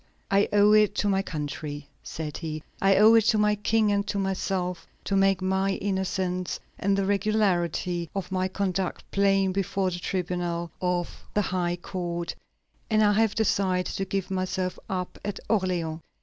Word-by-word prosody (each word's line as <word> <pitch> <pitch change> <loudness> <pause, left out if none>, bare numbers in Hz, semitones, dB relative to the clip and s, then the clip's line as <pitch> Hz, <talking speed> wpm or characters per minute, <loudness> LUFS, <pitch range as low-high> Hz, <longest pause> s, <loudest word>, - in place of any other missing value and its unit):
"I 200 +1 +3
owe 205 0 +5
it 210 -1 +4
to 205 - +1
my 195 -1 +2
country," 150 -3 -5
said 155 -2 -5
he, 155 -2 -5 0.2
"I 195 0 +5
owe 215 +3 +7
it 225 -2 +5
to 220 - +4
my 210 0 +3
King 210 +1 +2
and 200 0 0
to 205 -1 -2
myself 190 -2 -2 0.2
to 200 - -1
make 195 -1 +3
my 190 +1 +1
innocence 190 -2 -2 0.2
and 200 0 +1
the 195 - +1
regularity 185 -4 +1
of 195 -1 -4
my 185 0 +1
conduct 190 -1 -2
plain 195 -1 +3
before 190 0 0
the 175 - -4
tribunal 175 -2 -2
of 180 -1 -2
the 210 - +3
high 175 -2 -1
court, 175 -1 -4 0.6
and 215 -1 +4
I 205 0 +5
have 220 0 +2
decided 190 -4 +1
to 195 - -1
give 195 -1 -3
myself 185 0 -2
up 180 -1 -3
at 205 -1 -4
Orleans." 180 -6 0
190 Hz, 165 wpm, -26 LUFS, 180-200 Hz, 0.6 s, owe